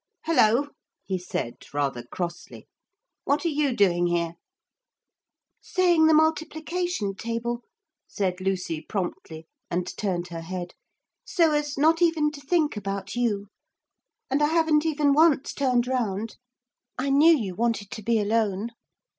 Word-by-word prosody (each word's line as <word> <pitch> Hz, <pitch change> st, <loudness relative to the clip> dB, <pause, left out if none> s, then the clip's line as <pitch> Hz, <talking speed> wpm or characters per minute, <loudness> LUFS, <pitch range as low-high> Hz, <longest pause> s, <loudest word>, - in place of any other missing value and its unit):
'Hullo!' 285 Hz, -3 st, +3 dB, 0.4 s
he 190 Hz, -1 st, -2 dB
said 145 Hz, -9 st, -4 dB, 0.2 s
rather 140 Hz, -4 st, -1 dB
crossly, 170 Hz, +8 st, -6 dB, 0.6 s
'what 285 Hz, +4 st, 0 dB
are -, -, +3 dB
you 295 Hz, -2 st, +1 dB
doing 175 Hz, -4 st, +3 dB
here?' 170 Hz, -1 st, 0 dB, 1.3 s
'Saying 350 Hz, -4 st, +3 dB
the 320 Hz, -, +5 dB
multiplication 315 Hz, -, 0 dB
table,' 235 Hz, +3 st, -3 dB, 0.5 s
said 185 Hz, -2 st, -2 dB
Lucy 180 Hz, -4 st, -2 dB
promptly 165 Hz, -3 st, -5 dB, 0.2 s
and 175 Hz, +1 st, -3 dB
turned 175 Hz, -4 st, -2 dB
her 165 Hz, -1 st, -6 dB
head, 175 Hz, +1 st, -6 dB, 0.5 s
'so 330 Hz, -3 st, +2 dB
as 295 Hz, -1 st, -1 dB
not 320 Hz, +4 st, +3 dB
even 325 Hz, -3 st, +3 dB
to 290 Hz, -1 st, -10 dB
think 300 Hz, -1 st, +1 dB
about 195 Hz, 0 st, -4 dB
you. 220 Hz, -5 st, 0 dB, 0.8 s
And 275 Hz, +2 st, 0 dB
I 295 Hz, -, +4 dB
haven't 320 Hz, -1 st, +2 dB
even 295 Hz, -2 st, +2 dB
once 300 Hz, -2 st, +3 dB
turned 250 Hz, -3 st, +1 dB
round. 225 Hz, -4 st, -2 dB, 0.6 s
I 275 Hz, +2 st, -1 dB
knew 310 Hz, +4 st, +6 dB
you 200 Hz, -8 st, -4 dB
wanted 220 Hz, -1 st, -1 dB
to 215 Hz, -, -6 dB
be 230 Hz, +1 st, +1 dB
alone. 215 Hz, 0 st, 0 dB
235 Hz, 135 wpm, -25 LUFS, 190-300 Hz, 1.3 s, knew